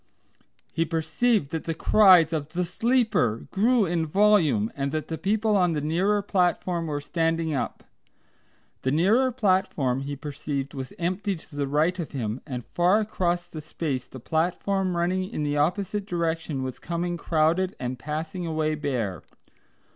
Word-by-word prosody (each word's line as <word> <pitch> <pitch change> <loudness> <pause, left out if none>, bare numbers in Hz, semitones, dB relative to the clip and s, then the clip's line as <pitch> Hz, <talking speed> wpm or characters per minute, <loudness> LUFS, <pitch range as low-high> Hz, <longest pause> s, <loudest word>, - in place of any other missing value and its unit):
He 165 - +1
perceived 165 - 0
that 160 -1 -3
the 165 - -2
cries 180 -4 +6
of 150 -2 -2
"The 180 0 0
Sleeper!" 220 - +1
grew 225 +2 +3
in 165 -2 -1
volume, 160 - +3
and 140 0 -2
that 155 0 -3
the 160 - -3
people 215 +2 +1
on 180 -3 +3
the 150 - -1
nearer 190 +7 +1
platform 180 -3 0
were 145 -2 -2
standing 165 +1 -1
up. 135 - -3 1.0
The 130 - 0
nearer 210 - +3
platform 185 - +1
he 140 +1 -4
perceived 140 -1 -4
was 130 -2 -6
empty 185 +3 -1
to 160 -2 -14
the 145 -1 -1
right 155 +6 +1
of 165 - -5
him, 120 -2 -3
and 125 -4 -5
far 180 +4 +3
across 175 -5 -1
the 160 -3 -8
space 145 -5 -4
the 130 - -10
platform 180 +5 0
running 185 +2 0
in 155 - -3
the 145 0 0
opposite 195 +6 0
direction 165 -5 -2
was 130 -1 -5
coming 175 +1 -2
crowded 170 +3 +1
and 125 0 -4
passing 160 +4 -4
away 155 -1 0
bare. 125 - -2
165 Hz, 160 wpm, -26 LUFS, 145-185 Hz, 1.0 s, cries